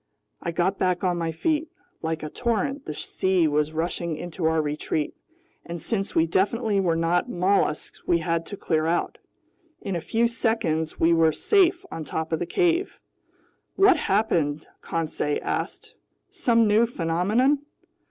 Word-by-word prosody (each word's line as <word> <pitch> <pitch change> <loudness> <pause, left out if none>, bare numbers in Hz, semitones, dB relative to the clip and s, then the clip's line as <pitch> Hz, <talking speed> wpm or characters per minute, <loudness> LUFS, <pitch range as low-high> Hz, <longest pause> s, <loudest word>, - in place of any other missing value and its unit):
I - - -3
got 180 +4 0
back 180 0 +1
on 180 -2 +1
my 165 -1 -1
feet. 305 - -1 0.3
Like 160 -1 -3
a 155 - -4
torrent 250 +4 -1
the - - -4
sea 185 0 +1
was 150 0 +1
rushing 165 0 -2
into 175 0 -5
our 160 0 +3
retreat, 150 0 -2 0.5
and 170 0 -6
since 195 +3 -2
we 160 - +4
definitely 205 +5 +1
were 175 -4 +2
not 170 +7 +1
mollusks, 185 -5 0
we 175 - +4
had 165 0 -1
to 200 - -7
clear 160 -3 0
out. 170 +1 -1 0.6
In 195 -3 -4
a 170 - -2
few 225 +7 +1
seconds 220 -10 -1
we 165 +1 +4
were 165 -1 +4
safe 370 - +2
on 160 - -5
top 160 +1 -4
of 160 - 0
the 175 - -3
cave. 355 - +1 0.8
"What 390 -2 +6
happened?" 165 -8 0 0.2
Conseil 155 -2 -2
asked. - - -4 0.4
"Some 230 -2 +3
new 215 +3 +4
phenomenon?" 215 - +1
175 Hz, 155 wpm, -25 LUFS, 160-225 Hz, 0.8 s, What